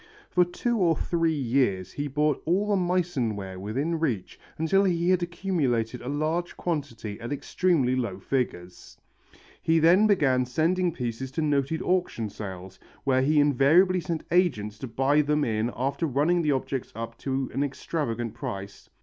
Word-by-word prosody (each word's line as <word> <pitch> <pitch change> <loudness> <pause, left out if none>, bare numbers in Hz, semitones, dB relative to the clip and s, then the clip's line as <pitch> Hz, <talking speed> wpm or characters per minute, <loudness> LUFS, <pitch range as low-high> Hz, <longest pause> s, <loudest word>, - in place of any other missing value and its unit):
For 180 - +5
two 230 +6 -2
or 170 -3 +3
three 165 -1 0
years 120 - 0
he 145 0 -3
bought 150 +1 0
all 195 +5 +1
the 205 - +3
Meissen 175 - 0
ware 95 -2 -7
within 135 - -2
reach 125 - -2 0.2
until 160 +5 +3
he 175 -2 +2
had 185 -1 +3
accumulated 150 -10 -1
a 125 - -5
large 155 +4 -2
quantity 130 - -4
at 115 - -5
extremely 145 -3 +1
low 115 -7 -2
figures. 95 -6 -4 0.7
Then 165 +3 +5
he 215 - +5
began 140 -11 +3
sending 170 +7 +1
pieces 125 -3 -4
to 160 - -1
noted 145 +1 0
auction 175 - 0
sales, 95 -2 -8 0.2
where 130 -1 +2
he 150 +3 +3
invariably 150 +7 +4
sent 170 -2 -3
agents 110 - +1
to 130 - -5
buy 135 +6 +2
them 150 0 +1
in 110 -1 0
after 140 +6 -1
running 155 +6 +2
the 150 -3 +1
objects 135 -1 -2
up 115 0 -5
to 135 -1 -2
an 140 - 0
extravagant 120 -5 -3
price. 100 -6 -7
145 Hz, 160 wpm, -26 LUFS, 120-170 Hz, 0.7 s, For